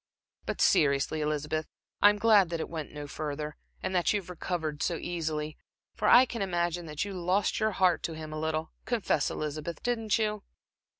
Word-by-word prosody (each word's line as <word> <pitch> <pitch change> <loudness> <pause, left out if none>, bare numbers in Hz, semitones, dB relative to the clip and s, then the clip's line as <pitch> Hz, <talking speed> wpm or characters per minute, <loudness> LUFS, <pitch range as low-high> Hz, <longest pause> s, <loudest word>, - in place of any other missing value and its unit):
But - - -2
seriously, 140 +1 +3
Elizabeth, 150 +1 -1 0.3
I 205 - +9
am 210 - +1
glad 205 -4 +5
that 170 -1 -2
it - - -4
went 160 -3 -5
no 150 -1 -6
further, 150 0 -4 0.3
and - - -2
that 180 -2 +3
you 210 - +1
have 180 -2 -10
recovered 160 -4 -3
so 175 - +1
easily. 155 -3 -3 0.3
For - - -1
I 250 +2 +8
can 235 -2 -5
imagine 175 -2 -1
that 150 +4 -2
you 200 - -5
lost 185 +2 +1
your 215 -1 +1
heart 185 -2 +3
to 165 - -3
him 155 -1 -7
a 155 - -4
little. 160 0 -2
Confess, 220 -11 +1
Elizabeth, 155 +2 -4
didn't 225 -4 +1
you?" 210 -2 -1
170 Hz, 190 wpm, -29 LUFS, 155-195 Hz, 0.3 s, I